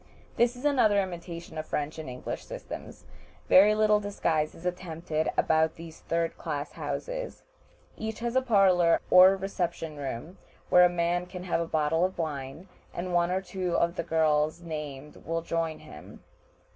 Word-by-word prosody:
This 240 Hz, +1 st, +2 dB
is 250 Hz, +4 st, -9 dB
another 235 Hz, -8 st, +4 dB
imitation 170 Hz, -3 st, -5 dB
of 155 Hz, -, -4 dB
the -, -, -25 dB
French 150 Hz, +2 st, -3 dB
and 155 Hz, -, -6 dB
English 125 Hz, 0 st, -6 dB
systems. -, -, -9 dB, 0.4 s
Very 205 Hz, +3 st, +7 dB
little 215 Hz, -1 st, +4 dB
disguise 165 Hz, -7 st, -1 dB
is 165 Hz, -, -13 dB
attempted 165 Hz, -3 st, -2 dB
about 160 Hz, 0 st, +2 dB
these 165 Hz, -1 st, -11 dB
third 165 Hz, 0 st, -2 dB
class 145 Hz, -3 st, -4 dB
houses. -, -, -5 dB, 0.5 s
Each 220 Hz, 0 st, -5 dB
has 235 Hz, +1 st, -3 dB
a 260 Hz, -, +4 dB
parlor 190 Hz, -8 st, +4 dB
or 185 Hz, +1 st, +8 dB
reception 175 Hz, -5 st, -3 dB
room, 145 Hz, +6 st, -6 dB, 0.3 s
where 180 Hz, 0 st, +7 dB
a -, -, +4 dB
man 175 Hz, +1 st, 0 dB
can 180 Hz, 0 st, -8 dB
have 175 Hz, -2 st, 0 dB
a 165 Hz, -, -3 dB
bottle 160 Hz, +1 st, +1 dB
of 185 Hz, +1 st, -1 dB
wine, 150 Hz, +1 st, -5 dB, 0.3 s
and 180 Hz, +1 st, -4 dB
one 175 Hz, 0 st, +3 dB
or 185 Hz, +1 st, 0 dB
two 180 Hz, -1 st, -3 dB
of 170 Hz, +1 st, +1 dB
the -, -, -1 dB
girls 155 Hz, -1 st, +1 dB
named 150 Hz, -3 st, -7 dB
will 165 Hz, 0 st, -3 dB
join 165 Hz, -1 st, -2 dB
him. 75 Hz, -, -13 dB
170 Hz, 170 wpm, -28 LUFS, 160-190 Hz, 0.5 s, or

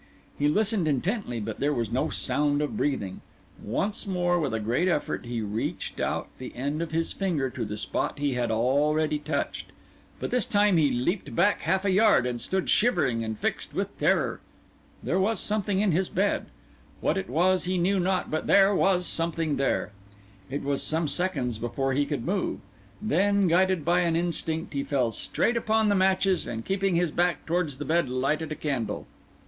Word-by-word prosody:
He 145 Hz, -, +3 dB
listened 205 Hz, +2 st, +1 dB
intently, 150 Hz, -, -1 dB
but 110 Hz, 0 st, -5 dB
there 145 Hz, +1 st, +1 dB
was 115 Hz, -2 st, -2 dB
no 125 Hz, +3 st, 0 dB
sound 145 Hz, 0 st, 0 dB
of 150 Hz, -, -3 dB
breathing. 135 Hz, -, -2 dB, 0.4 s
Once 200 Hz, -, -2 dB
more, 175 Hz, -2 st, +1 dB
with 150 Hz, -5 st, -1 dB
a 110 Hz, -, -1 dB
great 120 Hz, -, 0 dB
effort, 150 Hz, -7 st, -1 dB
he 120 Hz, -1 st, -3 dB
reached 105 Hz, +1 st, -4 dB
out -, -, -1 dB
the 130 Hz, -, -8 dB
end 145 Hz, +5 st, -2 dB
of 165 Hz, -2 st, -4 dB
his 165 Hz, 0 st, -1 dB
finger 160 Hz, -10 st, -1 dB
to 120 Hz, -, -4 dB
the 105 Hz, -1 st, -4 dB
spot -, -, -2 dB
he 145 Hz, -1 st, 0 dB
had 125 Hz, -1 st, -1 dB
already 150 Hz, +7 st, +1 dB
touched; 150 Hz, -1 st, -3 dB, 0.5 s
but -, -, -4 dB
this 250 Hz, -, +1 dB
time 205 Hz, -3 st, +3 dB
he 150 Hz, -3 st, +4 dB
leaped 130 Hz, -, -2 dB
back 205 Hz, -, +3 dB
half 190 Hz, +1 st, 0 dB
a 195 Hz, -, +3 dB
yard, 205 Hz, -, +4 dB
and 120 Hz, -1 st, -3 dB
stood 190 Hz, -1 st, -1 dB
shivering 155 Hz, -, +2 dB
and 110 Hz, -1 st, -4 dB
fixed -, -, -3 dB
with -, -, -2 dB
terror. -, -, +1 dB, 0.6 s
There 185 Hz, -, 0 dB
was 220 Hz, +4 st, +1 dB
something 205 Hz, -2 st, +1 dB
in 210 Hz, -3 st, +2 dB
his 180 Hz, +3 st, +1 dB
bed. -, -, 0 dB, 0.5 s
What -, -, +1 dB
it 95 Hz, -, -3 dB
was 180 Hz, +7 st, +2 dB
he 185 Hz, +1 st, 0 dB
knew 190 Hz, +3 st, +2 dB
not, 185 Hz, +1 st, 0 dB
but 155 Hz, -, -2 dB
there 200 Hz, 0 st, +5 dB
was 185 Hz, -2 st, +2 dB
something 165 Hz, -3 st, 0 dB
there. 135 Hz, -5 st, 0 dB, 0.6 s
It 140 Hz, +2 st, -3 dB
was 140 Hz, 0 st, -1 dB
some 160 Hz, 0 st, 0 dB
seconds 140 Hz, -10 st, -1 dB
before 125 Hz, +4 st, -1 dB
he 145 Hz, +2 st, +1 dB
could 140 Hz, -6 st, -3 dB
move. 190 Hz, +2 st, -1 dB, 0.4 s
Then, 200 Hz, -1 st, +2 dB
guided 180 Hz, -1 st, +2 dB
by 175 Hz, +1 st, +3 dB
an 170 Hz, -2 st, +1 dB
instinct, 165 Hz, -2 st, -1 dB
he 140 Hz, -1 st, -1 dB
fell 135 Hz, -4 st, 0 dB
straight 235 Hz, -, 0 dB
upon 220 Hz, -1 st, +2 dB
the -, -, +4 dB
matches, 190 Hz, -1 st, +2 dB
and 115 Hz, -1 st, -5 dB
keeping 195 Hz, -1 st, 0 dB
his 170 Hz, -2 st, +1 dB
back 175 Hz, +1 st, 0 dB
towards 165 Hz, -5 st, -1 dB
the 145 Hz, -, -5 dB
bed 165 Hz, 0 st, +1 dB
lighted 150 Hz, +5 st, -1 dB
a -, -, -2 dB
candle. 130 Hz, -10 st, -3 dB
160 Hz, 190 wpm, -27 LUFS, 135-190 Hz, 0.6 s, there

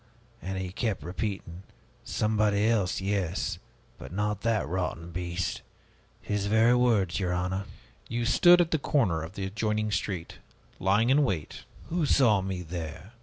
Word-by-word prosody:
And 95 Hz, +1 st, -4 dB
he 95 Hz, -1 st, -4 dB
kept 100 Hz, -5 st, -2 dB
repeating, 90 Hz, -1 st, -4 dB, 0.4 s
'Somebody 105 Hz, -1 st, +1 dB
else, 100 Hz, -5 st, +1 dB
yes, 95 Hz, -3 st, -1 dB, 0.4 s
but -, -, -9 dB
not 105 Hz, +2 st, -1 dB
that 115 Hz, -6 st, +1 dB
rotten 85 Hz, -1 st, -3 dB
beast!' 90 Hz, 0 st, -3 dB, 0.6 s
His 105 Hz, -1 st, -1 dB
very 110 Hz, +3 st, +5 dB
words, 110 Hz, -8 st, +2 dB
your 90 Hz, -2 st, 0 dB
honor." 90 Hz, +2 st, -2 dB, 0.4 s
"You 120 Hz, 0 st, -1 dB
stood 175 Hz, +7 st, +6 dB
at 170 Hz, -, 0 dB
the 160 Hz, -, +2 dB
corner 105 Hz, -, +1 dB
of 80 Hz, +3 st, -7 dB
the 100 Hz, -1 st, -4 dB
adjoining 105 Hz, +2 st, -1 dB
street, 95 Hz, -4 st, -3 dB, 0.4 s
lying 105 Hz, +6 st, +3 dB
in 145 Hz, +2 st, +5 dB
wait." 90 Hz, -, -3 dB, 0.2 s
"Who 165 Hz, -2 st, 0 dB
saw 115 Hz, -9 st, +4 dB
me 95 Hz, -1 st, -4 dB
there? 85 Hz, +3 st, -7 dB
100 Hz, 150 wpm, -28 LUFS, 90-110 Hz, 0.6 s, stood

